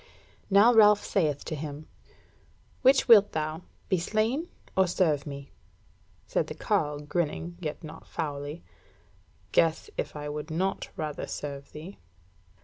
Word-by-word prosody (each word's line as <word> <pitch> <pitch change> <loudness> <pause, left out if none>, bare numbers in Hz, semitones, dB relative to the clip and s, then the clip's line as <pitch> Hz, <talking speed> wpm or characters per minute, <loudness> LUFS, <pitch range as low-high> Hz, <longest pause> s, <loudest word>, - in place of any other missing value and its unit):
Now 205 +5 +6
Ralph 210 -2 +6
saith 150 -7 0
to - - -4
him: 150 0 -6 1.0
"Which 265 0 +5
wilt 210 -4 +7
thou 155 +1 -2 0.3
be 185 - +1
slain, 220 - 0 0.3
or 190 -1 +4
serve 160 -5 +1
me?" 140 -1 -8 0.7
Said - - 0
the - - -6
carle, 150 0 0
grinning, 170 +2 -2
yet 155 -3 -5
not 155 0 -10
foully: 145 0 -5 0.9
"Guess 165 -1 +2
if - - -3
I 150 0 -5
would 150 +1 -5
not 185 +5 -1
rather 155 -2 -4
serve 140 -1 -6
thee!" 160 +6 -10
160 Hz, 135 wpm, -28 LUFS, 150-195 Hz, 1.0 s, wilt